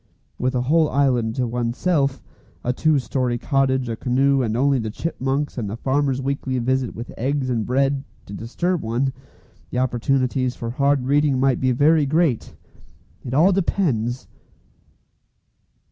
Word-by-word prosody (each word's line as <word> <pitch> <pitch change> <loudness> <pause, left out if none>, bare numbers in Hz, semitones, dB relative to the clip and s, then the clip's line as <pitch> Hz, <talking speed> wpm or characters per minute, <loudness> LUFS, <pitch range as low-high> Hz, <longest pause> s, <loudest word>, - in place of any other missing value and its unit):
With 130 +1 0
a 125 - +1
whole 155 +3 +3
island 125 -5 +1
to 125 - 0
oneself, 130 +4 0 0.4
a 125 - 0
two 155 +3 +2
storey 125 -2 -1
cottage, 130 -1 +1
a 115 - -2
canoe, 135 +4 +2
and 115 -2 -1
only 135 +1 +2
the 110 -1 -3
chipmunks, 135 +1 -2
and 105 -4 -3
the 110 - -5
farmer's 135 +1 0
weekly 135 -1 -2
visit 130 0 -1
with 115 +2 -7
eggs 135 +1 -1
and 115 -3 -1
bread, 135 +2 +1 0.2
to 100 - -10
disturb 170 - -2
one, 125 +4 -1 0.6
the - - -4
opportunities 130 0 0
for 115 0 -5
hard 140 0 +1
reading 140 -1 +2
might 135 -1 +2
be 130 -1 +2
very 145 +3 +3
great. 155 -5 0 0.7
It 125 +1 -4
all 170 +7 +5
depends! 130 - 0
130 Hz, 150 wpm, -22 LUFS, 120-140 Hz, 0.7 s, all